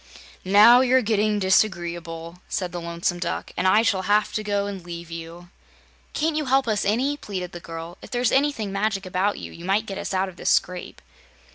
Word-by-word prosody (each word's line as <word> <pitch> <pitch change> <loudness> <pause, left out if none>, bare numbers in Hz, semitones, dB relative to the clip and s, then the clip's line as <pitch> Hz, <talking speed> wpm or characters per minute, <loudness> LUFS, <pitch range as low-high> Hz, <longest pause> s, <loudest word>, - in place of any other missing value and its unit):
"Now 215 +6 +7
you're 260 0 +3
getting 210 -1 +1
disagreeable," 175 -4 0
said 180 -4 -2
the 175 0 -5
Lonesome 170 +1 -2
Duck, 180 - -3
"and 185 - +1
I 210 +4 +5
shall 195 -4 +1
have 210 +1 +2
to 215 - -1
go 205 -1 0
and 195 -3 -6
leave 170 -1 -8
you." 165 +1 -9 0.6
"Can't 310 +1 0
you 305 -1 -1
help 270 -1 +2
us 215 -2 0
any," 250 +8 +1
pleaded 185 -8 -5
the 175 - -8
girl. 165 +1 -8
"If - - -11
there's 245 -1 +1
anything 270 -7 +1
magic 200 0 -1
about 185 +3 0
you, - - -8
you 170 - -11
might 195 +4 +1
get 195 -2 -6
us - - -4
out 190 0 0
of 185 -2 -11
this - - -1
scrape." 180 -1 -1
195 Hz, 205 wpm, -24 LUFS, 175-215 Hz, 0.6 s, Now